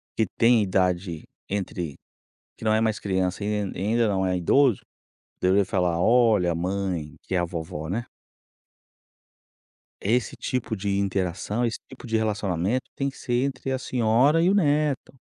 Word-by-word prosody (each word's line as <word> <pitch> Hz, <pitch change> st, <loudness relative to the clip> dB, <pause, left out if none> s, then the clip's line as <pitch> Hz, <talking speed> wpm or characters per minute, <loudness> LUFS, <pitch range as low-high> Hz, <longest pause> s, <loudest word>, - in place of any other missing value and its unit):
que 110 Hz, -, +1 dB
tem 115 Hz, -1 st, +5 dB
idade 90 Hz, -3 st, 0 dB, 0.3 s
entre, 90 Hz, -6 st, -3 dB, 0.6 s
que -, -, -9 dB
não 110 Hz, -, +3 dB
é 110 Hz, -, +3 dB
mais 110 Hz, -2 st, 0 dB
criança 95 Hz, 0 st, -1 dB
e -, -, -2 dB
e 105 Hz, -2 st, -2 dB
ainda 110 Hz, +4 st, +1 dB
não 95 Hz, -2 st, +1 dB
é 90 Hz, -1 st, +1 dB
idoso 125 Hz, +6 st, +3 dB, 0.6 s
deveria 95 Hz, +2 st, +3 dB
falar: 90 Hz, -3 st, 0 dB
"Olha, 110 Hz, -5 st, +4 dB
a 85 Hz, -, -1 dB
mãe, 90 Hz, -3 st, -2 dB
que 95 Hz, -, -3 dB
é -, -, +3 dB
a 85 Hz, -, +1 dB
vovó, 80 Hz, -2 st, -5 dB
né". 115 Hz, +6 st, -2 dB, 2.0 s
"É, 100 Hz, -, -1 dB
esse 125 Hz, 0 st, +1 dB
tipo 125 Hz, -3 st, -2 dB
de 100 Hz, 0 st, -1 dB
interação, 100 Hz, +3 st, -1 dB
esse 115 Hz, -, -2 dB
tipo 130 Hz, -1 st, -12 dB
de 110 Hz, 0 st, +1 dB
relacionamento 105 Hz, +1 st, -1 dB
tem 140 Hz, 0 st, -1 dB
que 135 Hz, -, -14 dB
ser 125 Hz, 0 st, 0 dB
entre 135 Hz, -1 st, -3 dB
a 130 Hz, -, -1 dB
senhora 130 Hz, +6 st, +3 dB
e 180 Hz, -, +4 dB
o -, -, +3 dB
neto". 150 Hz, -7 st, +1 dB
105 Hz, 170 wpm, -25 LUFS, 90-120 Hz, 2.0 s, tem